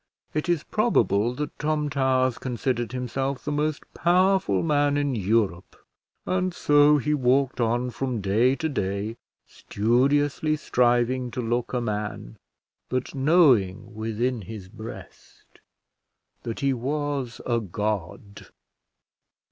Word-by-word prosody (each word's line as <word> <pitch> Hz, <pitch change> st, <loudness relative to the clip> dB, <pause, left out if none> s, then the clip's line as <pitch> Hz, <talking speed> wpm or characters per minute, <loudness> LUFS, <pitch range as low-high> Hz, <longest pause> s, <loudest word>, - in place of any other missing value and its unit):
It 155 Hz, +3 st, -2 dB
is 170 Hz, -3 st, +1 dB
probable 120 Hz, -, +1 dB
that 150 Hz, +2 st, -5 dB
Tom 150 Hz, 0 st, 0 dB
Towers 130 Hz, -3 st, +1 dB
considered 120 Hz, -2 st, -2 dB
himself 130 Hz, +1 st, -3 dB
the 150 Hz, -, -2 dB
most 150 Hz, 0 st, -1 dB
powerful 180 Hz, -, +2 dB
man 145 Hz, -2 st, +2 dB
in 145 Hz, -2 st, 0 dB
Europe; 100 Hz, -4 st, 0 dB, 0.5 s
and 185 Hz, -1 st, -1 dB
so 145 Hz, 0 st, +5 dB
he 150 Hz, +2 st, 0 dB
walked 130 Hz, -1 st, +1 dB
on 120 Hz, +2 st, 0 dB
from 125 Hz, -2 st, -3 dB
day 110 Hz, +7 st, +2 dB
to 160 Hz, +2 st, -2 dB
day, 105 Hz, -4 st, -3 dB, 0.3 s
studiously 140 Hz, +7 st, +1 dB
striving 125 Hz, -2 st, +1 dB
to 125 Hz, -, -6 dB
look 120 Hz, 0 st, -1 dB
a 125 Hz, -, -1 dB
man, 105 Hz, -, -4 dB, 0.5 s
but 130 Hz, 0 st, -2 dB
knowing 130 Hz, -, +3 dB
within 115 Hz, +2 st, -2 dB
his 100 Hz, -1 st, -9 dB
breast 110 Hz, +2 st, -12 dB, 0.8 s
that 115 Hz, +4 st, -5 dB
he 140 Hz, -1 st, +2 dB
was 135 Hz, -1 st, -3 dB
a 120 Hz, -2 st, +1 dB
god. 100 Hz, -1 st, -4 dB
125 Hz, 120 wpm, -25 LUFS, 115-145 Hz, 0.8 s, so